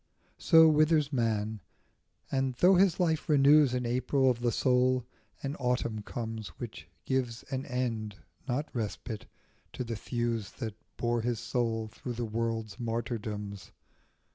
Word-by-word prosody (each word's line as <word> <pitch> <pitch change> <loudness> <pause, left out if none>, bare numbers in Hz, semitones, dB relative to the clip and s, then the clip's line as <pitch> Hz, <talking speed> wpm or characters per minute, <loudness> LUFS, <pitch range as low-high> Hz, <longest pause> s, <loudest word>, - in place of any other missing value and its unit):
So 160 -2 +7
withers 155 -1 +3
man, 110 -3 0 0.7
and 135 -1 0
though 180 +9 +5
his 190 -1 +4
life 160 -4 +1
renews 145 -2 +6
In 125 -1 -1
Aprils 130 +2 +2
of 120 - -13
the 120 -1 +2
soul, 125 +1 +2 0.4
an 140 +1 -2
autumn 125 -3 -1
comes 110 -1 -5
Which - - -8 0.2
gives 125 -3 -1
an 130 0 -3
end, 115 -5 -2 0.3
not 140 +4 -1
respite, 110 -1 -4 0.5
to - - -3
the 115 -1 -4
thews 115 -1 -2
That 110 -2 -5 0.2
bore 120 0 0
his 120 -1 -1
soul 115 -2 -1
through 120 +3 -7
the 120 0 -3
world's 110 -2 -3
martyrdoms. 110 -4 -4
120 Hz, 140 wpm, -30 LUFS, 115-135 Hz, 0.7 s, So